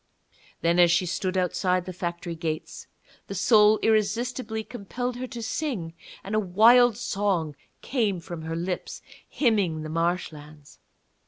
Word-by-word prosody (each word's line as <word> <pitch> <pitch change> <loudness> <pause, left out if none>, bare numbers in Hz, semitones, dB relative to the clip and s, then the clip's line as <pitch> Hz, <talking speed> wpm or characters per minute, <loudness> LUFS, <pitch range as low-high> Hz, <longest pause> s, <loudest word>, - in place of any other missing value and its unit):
Then, 170 +2 +2
as 175 -1 +7
she 170 +2 +2
stood 185 +2 -2
outside 180 0 0
the 185 - -6
factory 175 -1 -4
gates, 160 -1 -5 0.4
the 195 - -6
soul 210 +2 +5
irresistibly 220 +1 0
compelled 245 +3 -5
her 255 +1 -4
to 240 -2 -7
sing, 220 - -3 0.3
and 200 - -6
a 215 - +3
wild 220 +4 +5
song 195 -9 -1 0.3
came 220 -8 0
from 170 -1 -8
her 160 +1 -4
lips, 175 +2 -4 0.3
hymning 200 - +1
the 155 - -6
marshlands. 155 -3 -4
190 Hz, 140 wpm, -26 LUFS, 170-220 Hz, 0.4 s, as